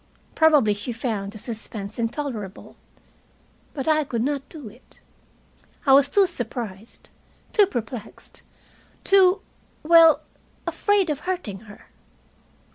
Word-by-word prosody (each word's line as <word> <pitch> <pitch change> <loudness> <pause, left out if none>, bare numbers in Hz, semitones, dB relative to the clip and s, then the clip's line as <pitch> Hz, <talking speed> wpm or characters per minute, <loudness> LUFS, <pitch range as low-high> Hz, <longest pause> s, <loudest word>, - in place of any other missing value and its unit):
Probably 300 -9 +4
she 205 +4 -6
found 220 -4 -3
the 215 - -10
suspense 215 -2 -6
intolerable. 230 -5 -5 1.0
But 275 0 -4
I 310 -1 +3
could 235 -5 -2
not 280 0 -3
do 295 -7 -9
it. 230 +5 -16 0.9
I 270 - +5
was 280 +1 +6
too 400 -1 +4
surprised, 230 - -6 0.4
too 415 -2 +5
perplexed, 235 - -7 0.6
too 385 0 +4 0.4
well, 330 0 +6 0.4
afraid 405 -5 +1
of 290 - -3
hurting 350 - -4
her. 205 - -15
260 Hz, 115 wpm, -23 LUFS, 220-320 Hz, 1.0 s, was